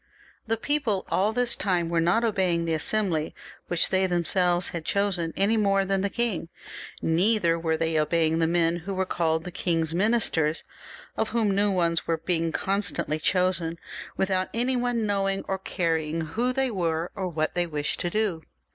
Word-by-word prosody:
The 225 0 0
people 235 -6 0
all 200 +3 +2
this 245 +1 +1
time 180 -4 0
were 170 0 0
not 175 +8 +2
obeying 185 -6 +1
the 165 - 0
Assembly 165 -1 0 0.3
which 175 -2 +1
they 190 0 +2
themselves 175 0 +2
had 170 -2 -5
chosen 185 -3 0
any 210 +3 +2
more 195 -2 +2
than 195 0 0
the 200 - 0
king, 225 -7 -2 0.5
neither 170 0 +2
were 160 -1 0
they 160 -1 0
obeying 160 +1 +1
the 165 - +2
men 170 0 +2
who 190 +3 -5
were 190 0 0
called 160 -3 0
the 180 - -7
king's 165 -2 -1
ministers, 175 -6 +1 0.5
of 220 - 0
whom 220 -3 +1
new 205 +1 +2
ones 170 -3 0
were 165 - +1
being 165 0 -1
constantly 185 -5 -1
chosen, 180 -1 0 0.4
without 185 -1 0
anyone 245 0 0
even 225 -2 0
knowing 195 -1 0
ox 190 0 -2
caring 165 -2 0
who 230 +11 -1
they 265 0 0
were, 170 -4 -1
or 190 -3 -3
what 155 -3 -2
they 175 -1 0
wished 150 -2 -3
to 175 - -1
do. 200 -4 -1
180 Hz, 175 wpm, -26 LUFS, 165-205 Hz, 0.5 s, all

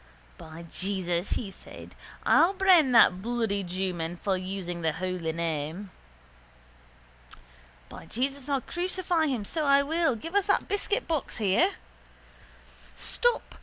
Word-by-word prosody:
—By 160 +1 -10
Jesus, 185 -2 -2
says 195 -4 -6
he, - - -11 0.4
I'll 345 +4 +5
brain 370 -8 +5
that 185 -5 +6
bloody 225 -3 -1
jewman 175 -2 -3
for 195 +2 -1
using 185 -2 -5
the 160 -1 0
holy 180 -1 -3
name. 165 +3 -3 2.0
By - - -11
Jesus, 270 +3 -3
I'll 275 -2 +1
crucify 350 0 -1
him 245 -7 -2
so 315 +8 -2
I 280 0 +5
will. 320 -2 +1
Give 325 - -8
us 405 0 +2
that 400 - +2
biscuitbox 405 - -2
here. 220 - +2 1.2
—Stop! 485 0 0
215 Hz, 125 wpm, -28 LUFS, -, 2.0 s, that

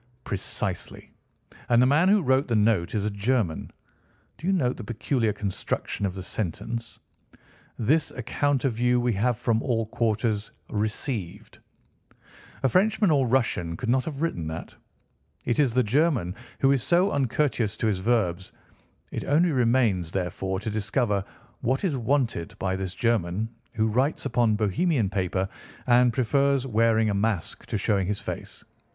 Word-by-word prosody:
"Precisely. 100 - -4 0.6
And 120 -1 +5
the 125 - +6
man 150 +8 +4
who 205 -2 +4
wrote 130 +1 +2
the 120 - 0
note 105 -5 +2
is 105 -1 0
a 105 - 0
German. 100 -4 -1 0.7
Do 170 - -5
you - - +3
note 130 -10 +1
the 120 - -7
peculiar 115 +1 0
construction 100 0 -3
of 95 - -5
the 95 - -6
sentence—'This 115 - -4
account 135 +3 -1
of 120 -4 -1
you 125 0 +3
we 120 -1 +1
have 115 +4 +1
from 115 -1 +1
all 115 -4 0
quarters 110 -1 -1 0.2
received.' 105 - -3 1.0
A - - +5
Frenchman 205 - +3
or 135 -4 +3
Russian 100 -10 0
could 120 - -4
not 130 +1 +3
have 150 -1 -4
written 85 - -2
that. 80 +2 -6 0.7
It 120 +4 0
is 140 -5 +4
the 125 - +4
German 125 - +1 0.3
who 135 - +5
is 135 -2 +2
so 180 - +3
uncourteous 130 -5 0
to - - -2
his 105 -4 +1
verbs. 95 -4 0 0.6
It - - -4
only 160 +5 +3
remains, 115 - +2
therefore, 95 +1 -2
to 110 - -3
discover 105 -1 0 0.4
what 130 +3 0
is 175 -7 +1
wanted 125 - -1
by 95 -1 -1
this 95 -1 -4
German 110 -3 0 0.3
who 110 - +1
writes 130 +8 0
upon 120 -5 +2
Bohemian 110 - +1
paper 95 -1 -1 0.4
and 125 0 +5
prefers 135 +3 +2
wearing 110 -2 +2
a - - -1
mask 100 -3 -1
to - - -1
showing 100 -2 +1
his 105 0 -1
face. - - -7
115 Hz, 155 wpm, -26 LUFS, 100-130 Hz, 1.0 s, the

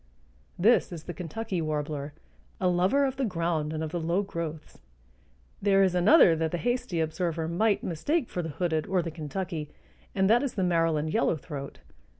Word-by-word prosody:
This 215 +3 +4
is 165 -3 -7
the 175 - -6
Kentucky 180 +2 -4
warbler, 150 -2 -3 0.5
a 185 - +1
lover 185 +11 +3
of 265 -1 -2
the 270 - -1
ground 165 -7 -1
and 160 0 -3
of 155 - -4
the 175 - -2
low 170 +5 0
growths. 165 -5 -6 0.8
There 195 -1 +4
is 185 -2 +2
another 180 - +6
that 160 0 0
the 175 - -2
hasty 245 -4 -1
observer 160 0 -1
might 205 +6 +1
mistake 240 - -1
for 180 - -3
the 165 - -5
hooded 160 0 -1
or 185 -2 +1
the 165 - -4
Kentucky, 155 0 -5 0.5
and 190 -1 +3
that 230 +4 +5
is 280 -3 -3
the 190 - 0
Maryland 165 -3 +1
yellowthroat. 150 -9 -2
175 Hz, 175 wpm, -28 LUFS, 160-195 Hz, 0.8 s, another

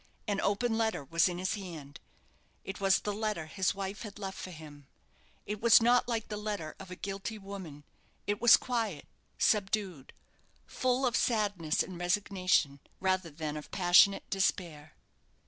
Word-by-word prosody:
An 200 -2 0
open 225 +3 0
letter 220 -9 0
was 165 +6 +2
in 175 - -4
his 185 +1 -1
hand. 165 -9 -8 0.6
It 195 +1 -7
was 195 -1 +3
the 205 - -2
letter 210 -6 -2
his 190 +4 -1
wife 195 +1 -5
had 210 -3 -8
left 195 -2 -6
for - - -6
him. 150 -4 -12 0.6
It 210 0 -5
was 235 0 +7
not 240 +2 +3
like 230 -2 -2
the 210 - -5
letter 205 -7 -4
of 190 - -10
a 180 - -7
guilty 200 +4 -5
woman. 190 -8 -9 0.4
It 205 +1 -2
was 240 -1 +8
quiet, 225 - -3 0.3
subdued; 195 -8 0 0.5
full 255 +1 0
of 245 - +1
sadness 205 -9 +1
and 180 -2 -9
resignation, 180 -5 +1 0.2
rather 185 -2 0
than 155 0 -5
of 150 - -8
passionate 180 +2 +5
despair. 170 -6 -1
195 Hz, 160 wpm, -31 LUFS, 170-210 Hz, 0.6 s, was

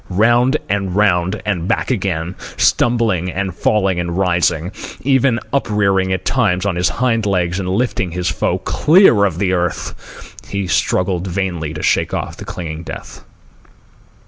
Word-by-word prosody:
Round 120 +8 +3
and 100 -2 -1
round 95 -1 +2
and 90 -5 -1
back - - 0
again, 90 -6 -2 0.2
stumbling 110 -7 +2
and 95 -1 -3
falling 95 -1 +1
and 85 0 -3
rising, 85 -2 +1 0.3
even 130 -2 +2
uprearing 100 -7 +1
at 95 - -2
times 90 +2 +1
on 100 -3 0
his 90 0 +1
hind 115 -4 0
legs 90 -2 0
and 90 -2 -3
lifting 100 -2 0
his 90 +1 -3
foe 85 - 0
clear 155 - +4
of 90 -5 -1
the 95 0 0
earth, 90 -1 -4
he 100 -1 -3
struggled 90 0 0
vainly 90 -4 -2
to 75 - -5
shake - - +1
off - - -4
the - - -8
clinging 80 -2 -6
death. 85 - -9
95 Hz, 150 wpm, -17 LUFS, 90-105 Hz, 0.3 s, clear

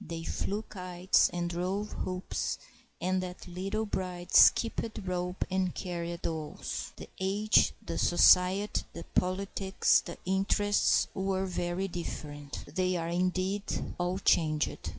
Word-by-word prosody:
They 165 0 -6
flew 205 +5 -2
kites 185 -3 +1
and 175 0 -2
drove 185 +4 -2
hoops, 185 0 -3 0.4
and 185 +1 0
that 180 0 -7
little 195 +5 -2
bride 180 -3 -4
skipped 230 -1 +5
rope 180 0 -2
and 185 -1 0
carried 170 -1 -4
dolls. 160 -2 -4
The - - -9
age, 200 +3 +3
the - - -3
society, 185 +3 +5
the 170 - -8
politics, 190 +1 +2
the 170 - -8
interests, 195 +2 +2
were 190 -1 -1
very 180 +1 -2
different. 145 -5 -6
They 185 +1 +1
are, 165 0 -3
indeed, 185 +3 -1
all 175 +1 0
changed. 155 -5 +1
185 Hz, 125 wpm, -30 LUFS, 175-195 Hz, 0.4 s, skipped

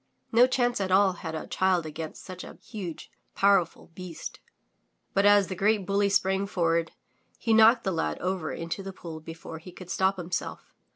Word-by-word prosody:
No 240 +2 +6
chance 245 -3 +1
at 190 - -1
all 190 0 +5
had 160 -2 -6
a 155 - -5
child 185 -3 +1
against 155 0 -7
such 185 -1 -8
a - - -10
huge, 185 -9 -7 0.2
powerful 195 -5 +2
beast. 180 -2 -8 0.7
But 195 +1 +4
as 205 -1 +6
the 190 - -5
great 205 +1 +2
bully 200 +1 +2
sprang 195 0 +1
forward, 170 -3 0 0.4
he 225 - +1
knocked 225 +2 +6
the 190 - 0
lad 160 -2 -1
over 185 -3 -2
into 165 +3 -4
the 195 0 -7
pool 165 -4 -8
before 160 0 -9
he 180 +3 -11
could 180 0 -10
stop 190 +1 +1
himself. 175 -1 -5
185 Hz, 180 wpm, -27 LUFS, 170-200 Hz, 0.7 s, No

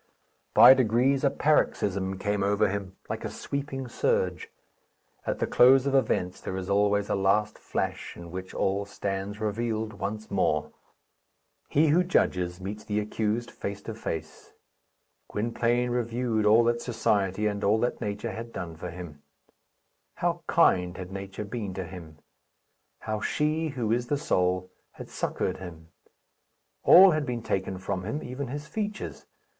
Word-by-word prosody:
By - - +10
degrees 130 +2 +2
a 140 - +5
paroxysm 100 -11 +1
came 105 +1 -1
over 100 +1 +2
him, 100 -1 -4
like - - -4
a - - -3
sweeping 135 -2 -4
surge. 470 - 0 0.8
At - - 0
the - - 0
close 130 +2 +6
of 140 - 0
events 110 -8 +1
there 95 - -4
is 95 +1 -4
always 100 0 +2
a - - 0
last 100 +2 +1
flash, - - -3
in 85 -1 -10
which 95 +1 -6
all 100 +1 0
stands 100 0 -4
revealed 110 0 -2
once 105 +2 -5
more. 75 -6 +1 1.0
He 155 +2 +3
who 170 +5 +4
judges 90 - +1
meets 105 +3 -6
the 105 0 -1
accused 110 +2 -2
face 100 0 -6
to 115 - -5
face. 80 -8 -6 0.7
Gwynplaine 120 +2 0
reviewed 115 -2 0
all 110 +3 +6
that 120 0 +1
society 105 -4 0
and 105 -1 -1
all 105 +2 +4
that 120 - -1
nature 105 +2 -3
had 115 +1 -7
done 85 -6 -6
for 90 +2 -6
him. 85 -4 -9 0.9
How - - -1
kind 90 -1 +3
had 90 0 -7
nature 95 +1 -6
been 105 -3 -5
to 95 - -3
him! 85 -3 -10 0.8
How 110 -1 -3
she, 155 +5 0
who 125 -7 -2
is 120 +1 0
the 145 - +1
soul, 90 - 0 0.2
had - - -10
succoured - - -2
him! 80 -3 -10 0.9
All 190 +2 +9
had 155 -2 0
been 120 -4 -4
taken 95 -2 -2
from 95 0 -3
him, 110 +10 -3
even 130 +2 -5
his 145 +4 -5
features. 210 +3 -5
105 Hz, 155 wpm, -27 LUFS, 95-125 Hz, 1.0 s, By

